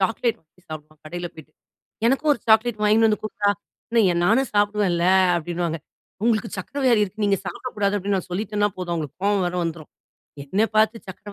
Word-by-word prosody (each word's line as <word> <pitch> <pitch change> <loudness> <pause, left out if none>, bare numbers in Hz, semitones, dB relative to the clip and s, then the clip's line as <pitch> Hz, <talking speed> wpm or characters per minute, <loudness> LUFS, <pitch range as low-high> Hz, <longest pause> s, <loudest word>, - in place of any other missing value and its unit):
Chocolate 225 +4 0
வாங்கி 165 +3 -30
சாப்பிடுவான் 155 0 -10
கடையில 175 +2 -5
பேயிட்டு. 155 -1 -14 0.5
"எனக்கும் 275 +4 +2
ஒரு 235 - -3
சாக்லேட் 220 0 +4
வாங்கின்னு 220 +2 +5
வந்து 210 - 0
குட்றா! 205 -1 0 0.4
என்ன 205 -7 +4
நானும் 230 +7 +2
சாப்பிடுவேன்ல," 205 -4 +2 0.3
அப்பிடின்னுவாங்க. 170 0 -2 0.4
"உங்களுக்கு 225 -3 +1
சர்க்கரை 275 +10 -5
வியாதி 230 -4 +4
இருக்கு, 205 +2 -4
நீங்க 200 -1 +2
சாப்பிடக்கூடாது" 205 -2 -2
அப்பிடின்னு 195 0 0
நான் - - -7
சொல்லிட்டன்னா 205 +2 0
போதும், 180 -2 -4
அவுங்களுக்கு 155 -3 -5
கோவம் 200 -2 +2
வேற 175 - -3
வந்துரும். 165 -2 -5 0.5
"என்ன 190 +9 -1 0.2
பார்த்து 220 +1 +4
சர்க்கரை 200 +2 -9
205 Hz, 170 wpm, -23 LUFS, 175-220 Hz, 0.5 s, வாங்கின்னு